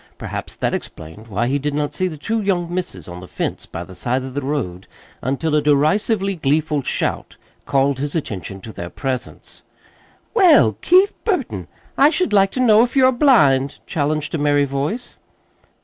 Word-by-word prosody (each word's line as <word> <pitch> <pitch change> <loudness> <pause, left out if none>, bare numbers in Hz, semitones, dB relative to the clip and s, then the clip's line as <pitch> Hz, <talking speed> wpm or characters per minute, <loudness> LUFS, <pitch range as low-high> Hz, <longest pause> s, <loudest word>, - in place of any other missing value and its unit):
Perhaps - - -6
that - - -1
explained 80 +8 -7
why 110 +2 -1
he 135 +4 0
did 145 +1 -2
not 145 -1 -1
see 185 - 0
the 160 -4 -6
two 225 +9 -2
young 175 -4 -1
misses 170 - -4
on 90 0 -8
the 90 - -10
fence - - -4
by 85 - -6
the 95 - -12
side 125 +8 -2
of 130 -1 -7
the 145 - -2
road 130 -11 -3 0.3
until 140 +5 -1
a 150 - +3
derisively 195 +8 +2
gleeful 150 -1 0
shout - - -3 0.3
called 140 -1 +1
his 145 +2 -3
attention 100 - -4
to 110 - -9
their 85 - -6
presence. 130 +4 -5 0.7
"Well, 330 - +6
Keith 375 +3 +4
Burton, 400 -5 -2 0.3
I 280 +2 +7
should 350 -3 -1
like 195 -1 +5
to - - -3
know 225 -4 +6
if 240 +2 0
you're 260 -1 +5
blind!" 150 - +4
challenged 155 0 -2
a 165 - -1
merry 145 -1 +3
voice. 140 - -4
145 Hz, 180 wpm, -20 LUFS, 130-200 Hz, 0.7 s, I